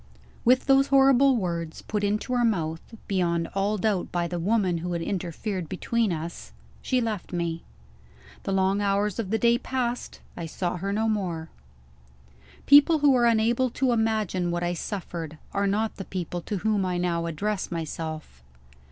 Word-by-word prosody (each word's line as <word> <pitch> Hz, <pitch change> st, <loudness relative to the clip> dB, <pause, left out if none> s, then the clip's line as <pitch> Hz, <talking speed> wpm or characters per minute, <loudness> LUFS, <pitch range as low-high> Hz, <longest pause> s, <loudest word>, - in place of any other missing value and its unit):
With 255 Hz, +2 st, +4 dB
those 275 Hz, 0 st, +5 dB
horrible 270 Hz, -1 st, +5 dB
words 170 Hz, -6 st, -3 dB
put 210 Hz, -1 st, -2 dB
into 210 Hz, +5 st, -1 dB
her 245 Hz, -1 st, +2 dB
mouth, 165 Hz, -8 st, 0 dB, 0.3 s
beyond 170 Hz, -3 st, 0 dB
all 200 Hz, +2 st, 0 dB
doubt 200 Hz, -2 st, 0 dB
by 175 Hz, -1 st, 0 dB
the 175 Hz, 0 st, -3 dB
woman 185 Hz, -2 st, +1 dB
who 175 Hz, +1 st, -3 dB
had 170 Hz, -, -2 dB
interfered 185 Hz, 0 st, -3 dB
between 225 Hz, +3 st, 0 dB
us 160 Hz, -, -6 dB, 0.3 s
she 255 Hz, -, +1 dB
left 220 Hz, -5 st, -3 dB
me. 170 Hz, -2 st, -2 dB, 0.8 s
The -, -, -3 dB
long 195 Hz, +1 st, +2 dB
hours 200 Hz, 0 st, 0 dB
of 210 Hz, -5 st, -2 dB
the 225 Hz, -, +1 dB
day 235 Hz, +1 st, +3 dB
passed: 250 Hz, -2 st, -3 dB, 0.2 s
I 165 Hz, -, -5 dB
saw 175 Hz, +2 st, -3 dB
her 195 Hz, +3 st, -3 dB
no 220 Hz, +2 st, 0 dB
more. 175 Hz, -7 st, -2 dB, 1.2 s
People 290 Hz, +3 st, +7 dB
who 280 Hz, -, +7 dB
are 240 Hz, -1 st, +4 dB
unable 235 Hz, +3 st, +2 dB
to 260 Hz, +1 st, 0 dB
imagine 215 Hz, -6 st, 0 dB
what 175 Hz, 0 st, -1 dB
I 175 Hz, 0 st, 0 dB
suffered, 170 Hz, -4 st, -5 dB, 0.2 s
are 200 Hz, 0 st, +1 dB
not 215 Hz, +3 st, 0 dB
the 195 Hz, -, -6 dB
people 175 Hz, -1 st, -4 dB
to 205 Hz, +4 st, -3 dB
whom 210 Hz, +1 st, +1 dB
I 180 Hz, -1 st, -1 dB
now 170 Hz, -1 st, 0 dB
address 200 Hz, +5 st, -2 dB
myself. 160 Hz, -, -5 dB
195 Hz, 170 wpm, -26 LUFS, 170-225 Hz, 1.2 s, People